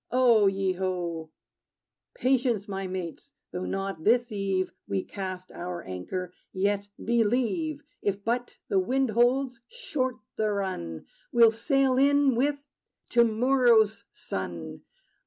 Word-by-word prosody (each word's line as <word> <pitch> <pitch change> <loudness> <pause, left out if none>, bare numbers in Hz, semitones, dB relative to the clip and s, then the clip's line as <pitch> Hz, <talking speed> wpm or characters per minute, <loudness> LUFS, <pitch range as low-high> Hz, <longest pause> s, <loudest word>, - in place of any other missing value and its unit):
O 240 -5 +5
ye 195 -1 +1
ho! 175 -3 -3 0.9
Patience, 245 -5 +1
my 195 -1 -3
mates! 185 - -6 0.2
Though 180 +1 -4
not 195 -4 -3
this 240 +3 +3
eve 195 -2 -1 0.2
We 95 -1 -1
cast 185 -2 -6
our 175 -1 -5
anchor, 175 - -5 0.2
yet 200 +1 0 0.2
believe, 245 - +1 0.2
If 200 0 -1
but 245 +2 -1
the 195 - +2
wind 260 +5 +1
holds, 245 +2 +2
short 295 - -2 0.2
the 215 -1 +1
run: 135 - -4 0.3
We 235 -1 +5
'll 225 - +6
sail 260 +3 +2
in 285 0 +4
with 285 +4 0 0.4
to 240 -1 +5
morrow's 230 -2 +3
sun. 85 -4 -6
215 Hz, 125 wpm, -27 LUFS, 185-255 Hz, 0.9 s, ll